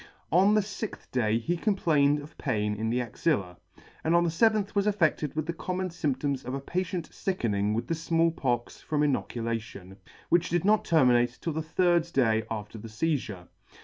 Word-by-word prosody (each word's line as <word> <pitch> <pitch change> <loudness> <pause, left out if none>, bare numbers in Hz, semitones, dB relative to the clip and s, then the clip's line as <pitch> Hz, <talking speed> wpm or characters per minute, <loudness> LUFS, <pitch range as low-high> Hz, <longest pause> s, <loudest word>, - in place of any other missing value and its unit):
On 195 +5 +5
the 215 - +4
lixth 205 +1 -7
day 115 -3 +1
he 165 +10 -1
complained 150 -7 +2
of 150 - -13
pain 105 -6 0
in 110 +2 -2
the 120 +2 +1
axilla, 115 - -1 0.5
and 165 +2 +2
on 170 - +5
the 170 - 0
feventh 215 +2 +2
was 200 0 +1
affe&ed 165 -8 +1
with 155 -1 -1
the 170 - -3
common 185 +2 -3
fymp 145 -6 -2
toms 140 -2 -1
of 130 +2 -4
a - - -3
patient 180 +3 -3
fickening 105 - -1
with 115 - -2
the - - -2
Small 165 +1 +1
Pox 120 -6 -2
from 150 -1 -1
inocula 115 -5 -1
tion, 95 -3 -12 0.3
which 175 0 +3
did 175 +1 0
not 215 +1 +3
terminate 125 -6 +3
'till 165 - -3
the 160 - -2
third 170 +1 +1
day 110 -4 +3
after 110 0 -6
the 115 - -8
feizure. 110 - -2
150 Hz, 190 wpm, -28 LUFS, 115-175 Hz, 0.5 s, On